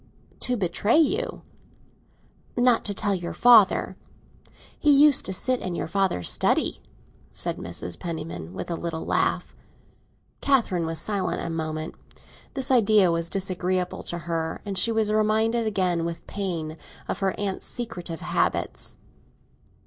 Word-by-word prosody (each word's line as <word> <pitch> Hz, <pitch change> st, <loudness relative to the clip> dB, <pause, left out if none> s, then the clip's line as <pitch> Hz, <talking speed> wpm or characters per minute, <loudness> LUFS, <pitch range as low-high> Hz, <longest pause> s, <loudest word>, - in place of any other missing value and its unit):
"To 250 Hz, -1 st, +1 dB
betray 200 Hz, -, +1 dB
you?" 350 Hz, +8 st, +1 dB, 1.1 s
"Not 245 Hz, -1 st, +4 dB
to 205 Hz, -, +1 dB
tell 205 Hz, 0 st, +1 dB
your 175 Hz, -2 st, -4 dB
father. 230 Hz, -5 st, +5 dB, 0.8 s
He 300 Hz, -, +2 dB
used 290 Hz, 0 st, +6 dB
to -, -, -2 dB
sit 250 Hz, +7 st, +1 dB
in 180 Hz, -2 st, -4 dB
your -, -, -2 dB
father's 190 Hz, -, 0 dB
study!" -, -, +2 dB, 0.5 s
said -, -, -3 dB
Mrs. 85 Hz, -1 st, -5 dB
Penniman, 160 Hz, -, -6 dB
with -, -, -5 dB
a -, -, -1 dB
little 165 Hz, -1 st, -5 dB
laugh. -, -, 0 dB, 0.9 s
Catherine 215 Hz, -12 st, +1 dB
was 165 Hz, 0 st, -3 dB
silent 200 Hz, 0 st, -1 dB
a 170 Hz, -, -3 dB
moment. 155 Hz, -1 st, -4 dB, 0.6 s
This 265 Hz, 0 st, 0 dB
idea 215 Hz, -6 st, +5 dB
was 165 Hz, 0 st, -1 dB
disagreeable 185 Hz, -1 st, -1 dB
to 175 Hz, -, -2 dB
her, 165 Hz, -1 st, -2 dB
and 200 Hz, -1 st, -4 dB
she 230 Hz, -, +4 dB
was 220 Hz, -2 st, +1 dB
reminded 220 Hz, +2 st, +1 dB
again, 185 Hz, -5 st, 0 dB
with 170 Hz, 0 st, -5 dB
pain, 170 Hz, -6 st, -4 dB, 0.3 s
of -, -, -3 dB
her 195 Hz, -1 st, -1 dB
aunt's 200 Hz, -2 st, -3 dB
secretive 175 Hz, -9 st, -5 dB
habits. -, -, -1 dB
190 Hz, 140 wpm, -25 LUFS, 170-220 Hz, 1.1 s, used